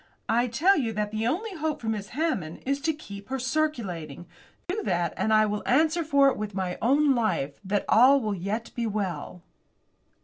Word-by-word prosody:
I 240 +2 +2
tell 310 - +3
you 230 -5 -1
that 210 0 -2
the 220 +1 -1
only 390 - -2
hope 315 -3 -2
for 225 - -7
Miss 210 -2 -2
Hammond 225 - -3
is 275 +1 -1
to 320 - +1
keep 200 -10 -10
her 265 - -1
circulating. 235 - -2 0.4
Do 385 +5 -2
that, 175 - -1
and 220 - 0
I 215 0 +5
will 210 0 -2
answer 320 +5 +3
for 280 -3 +4
it - - -2
with 210 -1 -5
my 185 -2 -3
own 280 +4 +4
life, 175 - -1
that 200 +1 -1
all 260 +5 +6
will 215 -5 -2
yet 200 +5 -4
be 235 -1 -2
well." 180 -5 -4
225 Hz, 195 wpm, -26 LUFS, 200-285 Hz, 0.4 s, all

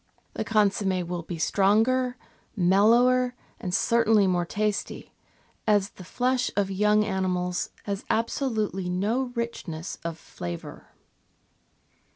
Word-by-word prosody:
The - - -2
consomm^ 200 -4 +1
will 175 0 -4
be 170 +1 -6
stronger, 225 +9 +2 0.4
mellower, 235 +7 +4 0.2
and 180 - -4
certainly 225 +1 +3
more 175 -2 +1
tasty, 210 +1 -3 0.5
as 205 -2 +3
the 185 - -12
flesh 250 +7 0
of 195 -1 +1
young 210 +2 +3
animals 180 -3 -1
has 200 -1 -4
absolutely 220 -5 -1
no 220 +8 0
richness 185 -8 -5
of 165 -1 -4
flavour. 85 - -8
205 Hz, 110 wpm, -26 LUFS, 180-230 Hz, 0.5 s, mellower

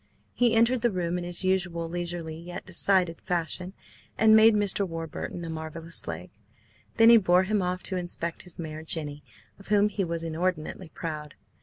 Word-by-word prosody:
He 240 -2 +3
entered 230 +2 +4
the 240 - +3
room 180 -3 -1
in - - -5
his 175 +1 -2
usual 185 -3 0
leisurely 170 -1 -4
yet 175 +2 -8
decided 185 -2 +2
fashion 180 +1 -2 0.4
and 220 0 +6
made 220 0 +7
Mr. 205 -1 +1
Warburton 165 +1 -5
a - - -6
marvellous 160 +1 -6
leg. 85 +2 -6 0.7
Then 225 0 +8
he 235 - +9
bore 180 -3 +4
him 210 +1 0
off 180 0 -2
to 190 - -2
inspect 175 -1 -4
his 180 - -8
mare, 155 -2 -6
Jenny, 150 -2 -4 0.4
of 195 - -14
whom 210 0 +4
he 200 -1 -2
was 170 -1 -3
inordinately 165 +1 -2
proud. 150 -2 -6
175 Hz, 175 wpm, -27 LUFS, 165-190 Hz, 0.7 s, he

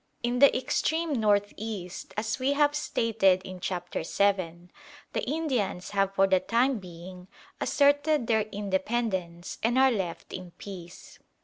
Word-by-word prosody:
In 240 +1 0
the 280 -1 +6
extreme 310 +4 0
north 205 -4 +2
east, 200 -5 -6
as 220 +3 -1
we 265 +2 +2
have 290 0 +3
stated 225 -10 +2
in 185 -1 -8
Chapter 180 -1 -3
VII., 175 -1 0 0.4
the - - -1
Indians 255 - -1
have 195 -1 +1
for 195 - +5
the 190 -1 +3
time 240 +4 +1
being 180 0 -11 0.3
asserted 285 -1 +3
their 220 -1 +2
independence 190 -3 -2
and 235 +3 +1
are 265 0 +6
left 190 -7 -4
in 180 -2 -7
peace. 180 -3 -10
205 Hz, 140 wpm, -28 LUFS, 185-255 Hz, 0.4 s, the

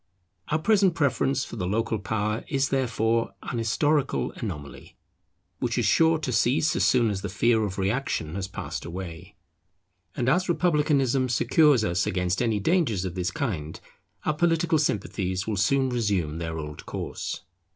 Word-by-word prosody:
Our 155 - +1
present 195 0 +3
preference 135 -2 +1
for 115 - -8
the 90 -3 -2
local 110 +2 0
power 105 +1 -2
is 135 -2 0
therefore 115 -5 0
an 120 - -3
historical 145 +5 +1
anomaly, 75 - -8 0.6
which - - -1
is - - +1
sure 165 0 +4
to 155 -4 -3
cease 125 +6 +2
as - - +1
soon 120 -4 +3
as 95 -1 -3
the 100 - -4
fear 110 +3 +2
of 95 -3 -3
reaction 95 - -1
has 95 0 -3
passed 95 - -6
away. 90 0 -7 0.8
And 125 - -1
as 180 +8 +2
Republicanism 145 -7 +2
secures 140 +1 +4
us 85 -2 0
against 90 +2 0
any 115 -3 +1
dangers 115 - +1
of 90 - -3
this 90 -1 -1
kind, 90 - -4 0.5
our 155 - +2
political 165 0 +2
sympathies 100 -7 -1
will 110 - -2
soon 130 +8 +2
resume 100 -10 -1
their 80 -1 -4
old 75 -1 -7
course. - - -5
115 Hz, 160 wpm, -26 LUFS, 95-140 Hz, 0.8 s, sure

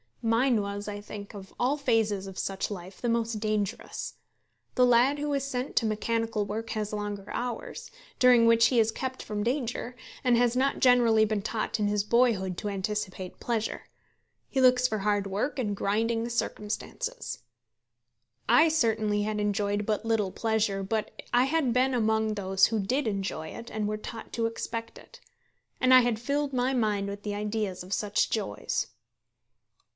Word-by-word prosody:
Mine 230 0 +3
was, 200 +1 -5
I 205 0 -5
think, 205 -1 -9
of 195 -2 -10
all 265 +4 +2
phases 225 -7 +1
of 190 -1 -9
such 195 0 -2
life 185 -1 -8
the 240 - 0
most 230 -1 0
dangerous. 215 -1 -3 0.6
The 250 - +5
lad 250 +4 +4
who 295 0 -2
is 275 -1 0
sent 260 -1 -3
to 230 - +4
mechanical 225 0 0
work 220 +3 -4
has 215 -1 -3
longer 205 -1 -4
hours, 245 -1 -5 0.3
during 250 -2 +6
which 230 0 +6
he 245 - +2
is 225 0 +3
kept 260 +3 -4
from 210 -1 -3
danger, 245 0 -2 0.3
and 245 -2 +4
has 240 0 +3
not 270 +2 +1
generally 235 -4 +5
been 215 -1 -1
taught 220 +1 -2
in 210 - +2
his 205 -1 +1
boyhood 210 -5 +2
to 210 - -3
anticipate 195 -2 -4
pleasure. 230 -2 -3 0.6
He 265 - 0
looks 250 0 +5
for 215 -3 -2
hard 205 0 +1
work 210 +10 -2
and 210 -5 -1
grinding 225 +4 0
circumstances. 450 - -4 1.1
I 320 +1 +6
certainly 220 -8 +1
had 215 0 -2
enjoyed 205 0 0
but 215 0 -1
little 220 -4 +1
pleasure, 220 -3 0
but 215 +2 -2 0.2
I 245 +1 +5
had 275 -4 +1
been 260 +2 +2
among 220 -1 +1
those 190 -1 +3
who 225 -1 -1
did 245 +7 0
enjoy 195 -6 -3
it 230 0 -9
and 215 -1 -2
were 215 0 -2
taught 225 +1 -8
to 230 - 0
expect 230 0 -5
it. 485 - -15 0.6
And 255 0 +5
I 255 - +9
had 240 -3 0
filled 280 +3 -1
my 255 +1 +1
mind 210 -5 +1
with 200 0 -6
the 205 -1 -3
ideas 210 -3 -2
of 185 +2 -5
such 205 0 +1
joys. 155 - -2
220 Hz, 170 wpm, -28 LUFS, 205-245 Hz, 1.1 s, I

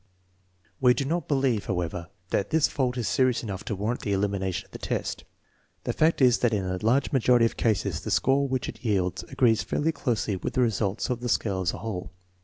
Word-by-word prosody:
We 125 -2 +5
do 140 - -1
not 170 +5 -1
believe, 135 -7 +1
however, 90 -3 -2 0.2
that 100 - 0
this 160 -1 +3
fault 130 -2 -1
is 120 - -1
serious 130 -3 +2
enough 100 -4 -5
to 105 - -2
warrant 110 +5 -2
the 100 - -1
elimination 95 -2 -1
of - - -27
the - - -8
test. - - -3 0.6
The - - -1
fact 155 -3 +3
is 125 -2 +5
that 115 -3 +2
in 100 -2 -1
a 95 +1 -3
large 130 +5 +2
majority 125 -3 +4
of 115 - -1
cases 100 -7 0
the - - -5
score 135 +9 +2
which 130 -1 -2
it - - -8
yields 95 -5 0
agrees 115 -4 +2
fairly 160 +2 0
closely 115 -9 -1
with 90 - -5
the 130 - +3
result 105 -4 0
of 125 - -1
the 120 0 -3
scale 100 -4 0
as 90 - +1
a - - -5
whole. 95 -2 -5
115 Hz, 215 wpm, -26 LUFS, 95-130 Hz, 0.6 s, We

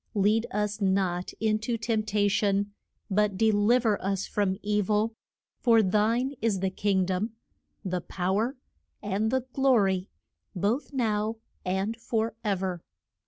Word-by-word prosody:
Lead 210 +3 +3
us 210 +1 -2
not 190 -2 +1
in 215 -1 +1
to 230 +2 -2
temp 220 -1 -1
ta 205 -1 +2
tion 205 0 +1 0.4
but 205 -1 +2
de 220 +2 +4
liv 225 +4 +3
er 210 -2 +2
us 195 0 -1
from 195 -2 0
e 210 0 +1
vil, 215 +3 0 0.4
for 230 -3 +5
thine 225 +7 +2
is 220 -4 +1
the 190 0 0
king 190 -1 +1
dom, 190 +5 -1 0.5
the 180 -1 -1
pow 185 +2 -2
er, 250 +5 -1 0.5
and 205 +2 0
the 260 +1 0
glo 270 -1 +4
ry, 190 -3 +2 0.5
both 210 - 0
now 220 -4 0 0.3
and 190 +5 -1
for 230 -1 -1
ev 195 -3 0
er. 180 -3 -2
210 Hz, 160 wpm, -28 LUFS, 195-225 Hz, 0.5 s, for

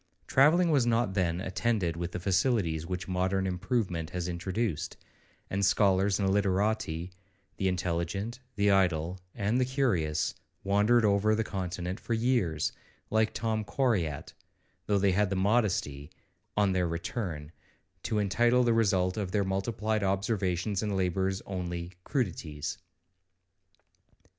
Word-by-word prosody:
Travelling 165 +6 +4
was 135 -6 +3
not 115 -3 +1
then 90 -3 0
attended 95 -2 -1
with 85 +1 -4
the 90 - -4
facilities 90 -4 +1
which 90 0 -4
modern 95 +1 0
improvement 90 -3 -1
has 90 -1 -3
introduced, 90 +1 -2 0.5
and 100 +1 -2
scholars 95 0 +3
and 100 - +1
literati, 95 -3 0 0.5
the 95 - 0
intelligent, 90 +5 -2 0.2
the 100 -1 +3
idle, 90 -2 +1 0.2
and 110 +6 +1
the - - +4
curious, 115 - 0 0.3
wandered 105 +4 +3
over 105 +1 +3
the 110 - 0
Continent 90 -1 -4
for 115 - -2
years, 110 - +1 0.4
like 110 0 +2
Tom 110 -2 -1
Coryat, 100 - -1 0.5
though 105 - +3
they 100 0 +3
had 100 +1 +2
the 100 - -1
modesty, 95 - 0 0.5
on 100 -2 +3
their 90 -1 +1
return, 85 -2 -4 0.5
to 110 - -2
entitle 120 +5 +3
the 120 -1 +3
result 95 -4 +2
of 100 -3 -2
their 100 0 +1
multiplied 105 +3 -1
observations 95 -1 0
and 105 -3 -1
labours 95 +1 0
only 90 -2 -4
'crudities.' 85 - -3
95 Hz, 130 wpm, -29 LUFS, 90-110 Hz, 0.5 s, Travelling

